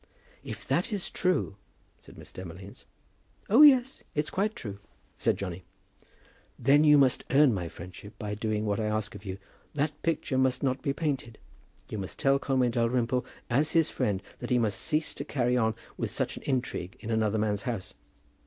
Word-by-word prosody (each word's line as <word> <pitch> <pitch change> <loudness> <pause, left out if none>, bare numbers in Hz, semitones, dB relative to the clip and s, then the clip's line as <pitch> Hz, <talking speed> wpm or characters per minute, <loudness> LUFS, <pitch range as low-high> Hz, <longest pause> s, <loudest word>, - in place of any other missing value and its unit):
"If - - -8
that - - +1
is 200 -4 -2
true 180 - 0 0.2
," - - -37
said - - -16
Miss - - -12
Demolines. 95 +2 -10 0.7
"Oh, 235 +7 +7
yes; 265 -3 +6
it's 150 +1 0
quite 210 +3 0
true," 100 - -6 0.4
said - - +2
Johnny. 90 -2 -5 0.9
"Then 140 +5 +5
you 150 -1 +7
must 135 -3 +3
earn 140 -2 +5
my 90 -4 -3
friendship 90 +5 -11
by 105 -1 -4
doing 110 0 -1
what 100 0 0
I 110 - 0
ask 110 0 -1
of 100 0 -11
you. 95 0 -4 0.4
That 150 +1 -1
picture 145 -5 0
must 130 0 +2
not 130 -1 0
be 140 - 0
painted. 135 -6 -2 0.5
You 110 - -5
must 95 - -6
tell 135 0 +3
Conway 130 -3 +1
Dalrymple 120 +1 +1 0.2
as 145 +6 +1
his 165 -2 +3
friend 105 -7 -1 0.2
that - - -5
he 125 - +3
must 110 -5 +1
cease 155 0 0
to - - -5
carry 125 -3 0
on 110 -3 +2 0.3
such - - -2
an - - -8
intrigue 125 -8 -2
in 115 +1 -5
another 110 -1 +1
man's 105 -1 0
house." 110 -6 -4
120 Hz, 180 wpm, -29 LUFS, 105-145 Hz, 0.9 s, Oh